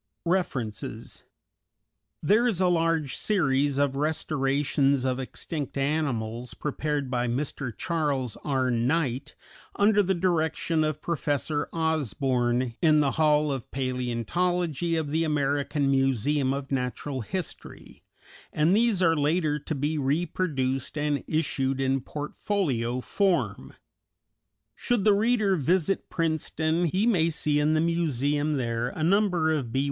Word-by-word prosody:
REFERENCES 135 - -3 1.0
_There 225 +9 +4
is 195 -6 -2
a 185 - +3
large 165 -5 +1
series 140 -8 +1
of 140 -1 +1
restorations 140 -2 +1
of 130 0 0
extinct 140 +2 -5
animals, 125 -5 -2
prepared 150 -2 -2
by 125 -1 0
Mr. 130 +1 -3
Charles 145 - -1
R. 130 -3 0
Knight, 130 +3 0 0.4
under 205 0 +4
the 190 -1 +1
direction 165 -2 +1
of 155 -1 -2
Professor 145 -2 -1
Osborn, 130 -6 0
in 155 -2 +5
the 140 -2 +2
Hall 150 -1 +2
of 135 -3 -5
Palæontology 145 +7 -1
of 150 -2 -4
the 160 +2 +1
American 145 -1 0
Museum 135 +1 +1
of 140 0 -4
Natural 130 +1 -2
History, 180 - -7 0.5
and 160 +5 +3
these 220 -4 +2
are 165 -2 +4
later 150 0 +1
to 150 +2 -4
be 150 +3 -1
reproduced 140 -2 -1
and 145 -1 0
issued 135 -4 -1
in 135 0 +1
portfolio 140 - -2
form._ 195 +4 -1 1.0
_Should 240 -5 0
the 210 - +5
reader 215 -2 +2
visit 175 +5 0
Princeton, 160 0 0
he 185 +6 +1
may 175 -9 +3
see 150 -2 0
in 150 +1 +2
the - - +3
museum 150 -3 0
there 120 -1 -1
a 155 - -5
number 180 -3 +2
of 135 -7 -2
B. 130 - 0
150 Hz, 125 wpm, -27 LUFS, 135-165 Hz, 1.0 s, in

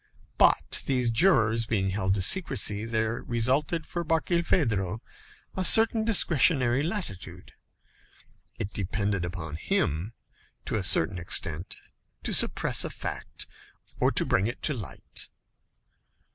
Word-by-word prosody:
But - - +3
these 125 -3 +1
jurors 115 - +3
being 95 -4 -1
held 95 -1 0
to 95 - 0
secrecy, 110 - +2
there 110 0 -2
resulted 135 +7 -1
for 175 - -4
Barkilphedro 155 - 0 0.6
a 190 - -1
certain 225 +3 +6
discretionary 145 - +3
latitude; 160 - -6 1.1
it 100 - -5
depended 100 0 -2
upon 85 -4 -6
him, 85 +7 -2 0.5
to - - -5
a - - 0
certain 90 +3 +2
extent, 85 0 -1 0.5
to - - -1
suppress - - +2
a - - -4
fact - - -6 0.5
or - - +3
bring 95 - +1
it 120 - -7
to 150 - +1
light. 110 -8 -6
115 Hz, 115 wpm, -27 LUFS, 95-155 Hz, 1.1 s, certain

